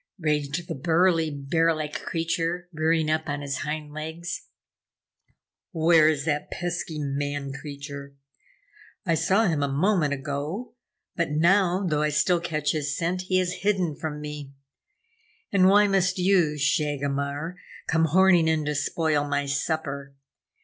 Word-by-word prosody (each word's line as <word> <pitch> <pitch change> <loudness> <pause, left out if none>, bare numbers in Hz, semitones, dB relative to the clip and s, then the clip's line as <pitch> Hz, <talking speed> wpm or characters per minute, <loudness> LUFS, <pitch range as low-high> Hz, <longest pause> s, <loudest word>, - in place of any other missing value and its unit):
raged 150 0 -1
the - - -3
burly, 165 +2 +2
bear 160 +3 +1
like 155 -1 -4
creature, 165 +1 -2
rearing 160 0 +1
up 155 0 0
on 145 +1 -2
his 140 -1 -3
hind 150 0 -4
legs. 160 +3 -6 1.3
"Where 160 -1 +5
is 145 -2 -1
that 150 -2 -1
pesky 175 -2 -4
man 145 -1 -3
creature? 140 0 -8 0.9
I 170 - +2
saw 195 +7 +2
him 160 -6 +1
a 140 - +1
moment 150 +1 +1
ago, 145 - -4 0.4
but 170 -2 0
now, 180 +4 +3
though 150 -4 +1
I 150 - +2
still 170 +4 +2
catch 155 -3 -1
his 145 -2 -2
scent, 180 +2 -1
he 185 - +2
has 185 0 -1
hidden 190 -6 +1
from 150 -1 -5
me. 150 -2 -7 1.0
And 185 -2 +5
why 205 +2 +6
must 190 -2 +1
you, 180 -5 +3
Shagomar, 145 +2 -1 0.3
come 165 0 +2
horning 175 0 +4
in 160 -1 +1
to 150 - -1
spoil 150 0 0
my 145 0 0
supper? 140 -1 -3
155 Hz, 140 wpm, -25 LUFS, 145-175 Hz, 1.3 s, why